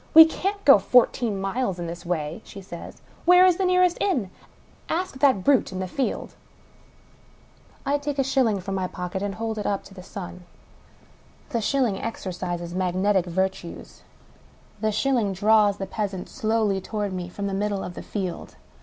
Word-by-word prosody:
" - - -29
We 320 0 +12
can't 395 +5 -3
go 275 -7 +9
fourteen 235 -2 +3
miles 195 0 -1
in 175 - -4
this 170 +1 -7
way," 160 +2 -2
she - - -11
says. 180 -3 -10
*' - - -27
Where 360 +1 +7
is 360 -2 +4
the 385 - +1
nearest 365 -1 +3
inn? 255 - 0 0.6
Ask 340 -5 -2
that 265 -9 +4
brute 275 -4 +3
in 185 - -5
the 185 0 -3
field! 265 +8 -3 0.8
" - - -30
I 285 +1 +1
take 290 0 -3
a 270 - +3
shilling 255 -7 +1
from 195 +2 -5
my 190 -1 -1
pocket 180 +1 -5
and 200 -1 -3
hold 220 -1 -3
it 210 - -2
up 200 -1 -2
in - - -15
the 190 - -10
sun. 180 -2 -8 1.0
The 230 - -1
shilling 240 -4 +1
exercises 175 -5 -4
magnetic 185 +1 +1
virtues. 190 0 -3 0.8
The 215 - 0
shil 215 +6 +1
ling 210 -6 +1
draws 205 +1 +4
the 195 - -3
peasant 195 -2 -4
slowly 215 -3 0
toward 205 0 -3
me 180 -1 -4
from 200 +3 -5
the 200 - -2
middle 200 0 -1
of 180 - -6
the - - -7
field. 190 -4 -5
205 Hz, 185 wpm, -25 LUFS, 185-255 Hz, 1.0 s, We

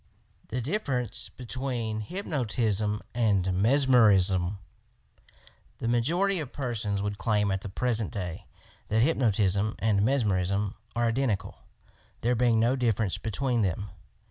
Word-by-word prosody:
THE 125 +2 -3
DIFFERENCE 130 - -2
BETWEEN 120 -3 -3
HYPNOTISM 110 - -1
AND 100 -6 +2
MESMERISM 105 -5 +4 1.2
The 115 - -3
majority 170 +12 +1
of 145 -5 -5
persons 105 -7 -2
would 105 -1 -3
claim, 105 -1 +1
at 95 0 -1
the 100 - -6
present 115 0 -1
day, 90 -2 -5 0.4
that 110 +1 +2
hypnotism 110 - +1
and 105 -2 +2
mesmerism 100 -5 +1 0.2
are 120 0 +2
identical, 115 -3 -1 0.6
there 120 +2 +2
being 120 -1 +3
no 120 +3 +3
difference 110 -6 0
between 120 +3 -1
them. 100 +1 -1
110 Hz, 115 wpm, -28 LUFS, 100-125 Hz, 1.2 s, MESMERISM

